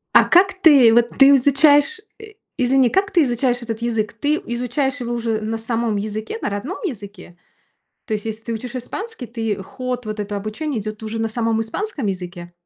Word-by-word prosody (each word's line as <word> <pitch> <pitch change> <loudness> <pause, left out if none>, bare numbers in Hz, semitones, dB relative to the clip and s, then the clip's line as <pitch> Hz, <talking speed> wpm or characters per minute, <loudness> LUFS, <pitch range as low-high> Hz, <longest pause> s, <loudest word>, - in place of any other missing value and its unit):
А - - +8
как 385 +2 +4
ты, 285 - +6
вот 240 0 +4
ты 275 +1 +8
изучаешь, 285 - +4 0.2
э, 435 -1 -12 0.2
извини, 255 -1 +3
как 395 +1 +1
ты 345 -4 +4
изучаешь 245 -1 0
этот 225 -1 -4
язык? 225 -3 -1
Ты 290 +7 0
изучаешь 250 +3 -2
его 240 0 -3
уже 230 -2 -2
на 220 +1 -3
самом 225 -1 -2
языке, 215 +2 -4
на - - -1
родном 250 - -4
языке? 205 - -7 0.7
То 220 - -5
есть, 210 0 -4
если 220 0 -5
ты 230 - -5
учишь 240 +3 -6
испанский, 285 - -6
ты 225 -4 -3
ход 250 +3 -5
вот 215 0 -5
это 205 0 -3
обучение 215 +5 -3
идет 215 +1 -6
уже 225 +1 -4
на 225 - 0
самом 225 0 -1
испанском 275 - -4
языке? 175 -2 -5
235 Hz, 190 wpm, -20 LUFS, 215-275 Hz, 0.7 s, А